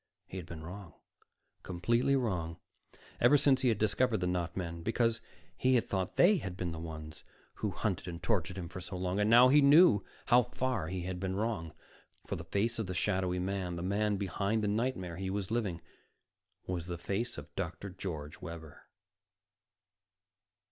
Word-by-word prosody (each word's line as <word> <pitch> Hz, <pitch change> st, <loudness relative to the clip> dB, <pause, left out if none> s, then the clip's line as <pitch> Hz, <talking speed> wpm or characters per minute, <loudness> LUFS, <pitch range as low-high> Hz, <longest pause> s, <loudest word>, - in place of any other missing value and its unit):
He 95 Hz, -, -8 dB
had 90 Hz, -3 st, -6 dB
been 80 Hz, -2 st, -8 dB
wrong, 90 Hz, +1 st, -9 dB, 0.7 s
completely 115 Hz, +9 st, +1 dB
wrong, 90 Hz, -10 st, -1 dB, 0.6 s
ever 130 Hz, +5 st, +6 dB
since 135 Hz, -2 st, +4 dB
he 130 Hz, -, +3 dB
had 110 Hz, -, +2 dB
discovered 110 Hz, +3 st, +2 dB
the 90 Hz, -, -1 dB
not 90 Hz, -1 st, -2 dB
men. 85 Hz, -2 st, -4 dB
Because 115 Hz, +3 st, +1 dB, 0.3 s
he 130 Hz, 0 st, +3 dB
had 120 Hz, -, +3 dB
thought 95 Hz, -2 st, -2 dB
they 195 Hz, +4 st, +6 dB
had 95 Hz, -, -5 dB
been 90 Hz, -2 st, -2 dB
the 80 Hz, -, -6 dB
ones 80 Hz, -2 st, -8 dB, 0.3 s
who 105 Hz, -, -1 dB
hunted 95 Hz, -2 st, -2 dB
and 85 Hz, -1 st, -6 dB
tortured 95 Hz, -4 st, 0 dB
him 90 Hz, -2 st, -4 dB
for 90 Hz, +2 st, -8 dB
so 90 Hz, +1 st, -6 dB
long. 90 Hz, +2 st, -1 dB
And 105 Hz, +1 st, +2 dB
now 120 Hz, +2 st, +8 dB
he 145 Hz, +3 st, +6 dB
knew 140 Hz, -, +7 dB, 0.2 s
how 120 Hz, +1 st, +6 dB
far 125 Hz, -6 st, -2 dB
he 90 Hz, +1 st, -3 dB
had 90 Hz, 0 st, -4 dB
been 95 Hz, 0 st, -2 dB
wrong. 100 Hz, -6 st, -2 dB, 0.5 s
For -, -, -3 dB
the -, -, -6 dB
face 115 Hz, +4 st, -1 dB
of 110 Hz, -, -2 dB
the 90 Hz, -, -4 dB
shadowy 95 Hz, -2 st, 0 dB
man, 90 Hz, -1 st, -2 dB
the 85 Hz, -, -4 dB
man 100 Hz, +2 st, +1 dB
behind 100 Hz, +2 st, -1 dB
the -, -, +1 dB
nightmare 100 Hz, -6 st, -1 dB
he 95 Hz, 0 st, -3 dB
was 100 Hz, 0 st, -3 dB
living, 105 Hz, -8 st, -1 dB, 0.8 s
was 90 Hz, -2 st, -3 dB
the 90 Hz, -1 st, -4 dB
face 100 Hz, +7 st, -3 dB
of 75 Hz, +2 st, -9 dB
Dr. 95 Hz, +1 st, -4 dB
George 80 Hz, -6 st, -6 dB
Webber. 85 Hz, -4 st, -9 dB
95 Hz, 185 wpm, -32 LUFS, 90-115 Hz, 0.8 s, now